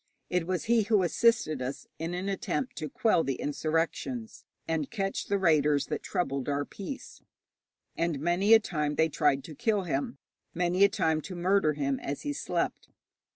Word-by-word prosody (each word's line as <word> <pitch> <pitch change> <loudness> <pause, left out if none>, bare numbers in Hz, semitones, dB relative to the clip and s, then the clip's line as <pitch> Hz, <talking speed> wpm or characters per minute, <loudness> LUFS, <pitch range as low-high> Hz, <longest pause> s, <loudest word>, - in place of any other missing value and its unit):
It 180 -2 0
was 185 -1 -1
he 235 0 +3
who 210 -2 +3
assisted 180 - +2
us 130 +2 -4
in 165 +2 -3
an 185 +2 -3
attempt 200 +6 -2
to 155 - -4
quell 195 0 +2
the 135 - -1
insurrections 165 - -2 0.2
and 160 -3 -1
catch 195 -3 -2
the 200 - +1
raiders 150 -5 +3
that - - -2
troubled 140 -6 -2
our 145 0 0
peace, 210 - -8 0.7
and 165 -4 -1
many 175 +8 +4
a - - +7
time 150 -8 -2
they 160 +1 +3
tried 140 -3 +2
to 160 - -9
kill 205 - 0
him, 140 -4 -2 0.4
many 180 +2 +2
a 200 - +7
time 165 -7 +1
to 185 +4 -7
murder 175 -2 +2
him 140 -2 -1
as 140 +1 -5
he 290 - -2
slept. - - -2
170 Hz, 175 wpm, -29 LUFS, 150-200 Hz, 0.7 s, a